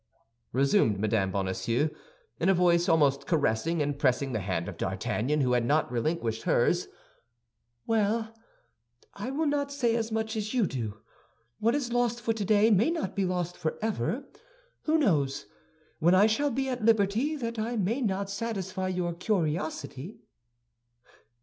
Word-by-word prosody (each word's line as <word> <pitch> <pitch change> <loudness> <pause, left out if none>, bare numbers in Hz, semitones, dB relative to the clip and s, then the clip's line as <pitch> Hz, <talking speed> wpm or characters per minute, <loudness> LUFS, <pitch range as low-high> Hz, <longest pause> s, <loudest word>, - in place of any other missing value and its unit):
resumed 135 - +2
Mme. 105 -2 +1
Bonacieux, 100 +9 0 0.5
in 175 - +2
a 195 - +5
voice 175 -1 +3
almost 145 -4 +3
caressing, 155 +1 +1
and 145 0 -3
pressing 135 0 +1
the 110 - 0
hand 90 -3 -2
of - - -6
D'Artagnan, 145 +7 -1
who 125 -2 +1
had 120 -1 +2
not 145 +2 +1
relinquished 120 -3 -1
hers, 175 +9 +2 1.0
"well: 220 +1 0 0.8
I 205 +5 -5
will 295 +4 -1
not 285 -1 0
say 245 -5 +1
as 225 -1 -2
much 220 0 -2
as 215 +2 -3
you 235 -5 +3
do; 115 - -4 0.6
what 230 +4 +2
is 250 -5 -2
lost 240 -1 +1
for 230 -1 0
today 215 +1 +3
may 215 +7 +4
not 335 -2 -3
be 195 -2 +1
lost 180 -1 -2
forever. 210 - -2 0.6
Who 315 +1 +3
knows, 145 - +1 0.5
when 170 +3 +4
I 195 +3 +6
shall 255 +7 +2
be 270 +1 -1
at 250 -3 -3
liberty, 225 +6 +2
that 230 -5 -4
I 230 +2 -2
may 220 +7 0
not 200 -3 -1
satisfy 195 -3 -3
your 180 -2 -1
curiosity?" 165 - -3
190 Hz, 150 wpm, -28 LUFS, 145-225 Hz, 1.0 s, I